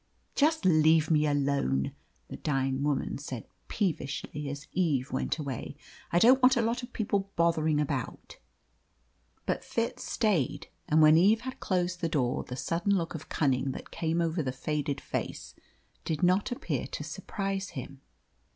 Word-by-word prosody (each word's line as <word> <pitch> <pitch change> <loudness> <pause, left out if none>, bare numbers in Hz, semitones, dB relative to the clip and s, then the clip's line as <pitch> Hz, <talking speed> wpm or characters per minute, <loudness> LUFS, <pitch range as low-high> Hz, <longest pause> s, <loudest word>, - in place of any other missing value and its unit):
"Just 310 -4 +2
leave 160 -2 +5
me 150 -1 +4
alone," 140 - +1 0.4
the - - -7
dying 135 -2 0
woman 145 -1 -1
said 130 -5 -6 0.2
peevishly 150 -5 -2
as 145 +1 -6
Eve 150 -8 0
went 130 - -1
away; 140 -6 -5 0.4
"I 170 - +3
don't 255 +8 +6
want 255 0 +6
a - - +3
lot 230 +3 0
of 245 0 -9
people 200 -3 -1
bothering 160 -3 +2
about." 140 -4 -3 1.1
But - - -1
Fitz 230 0 -2
stayed, 200 - 0 0.2
and 155 +1 +5
when 155 +1 +7
Eve 210 +6 +5
had 260 +1 -6
closed 180 -1 -1
the 165 - 0
door 130 -6 0
the 125 - -7
sudden 170 +9 0
look 165 -3 -1
of 160 -2 -8
cunning 135 -2 +1
that - - -9
came 165 +1 0
over 165 0 0
the 130 -3 -2
faded 145 +1 -2
face - - -5 0.5
did 160 -1 -2
not 185 +7 +3
appear 245 - -2
to - - -5
surprise 195 -1 -4
him. 135 +1 -7
160 Hz, 160 wpm, -29 LUFS, 140-190 Hz, 1.1 s, when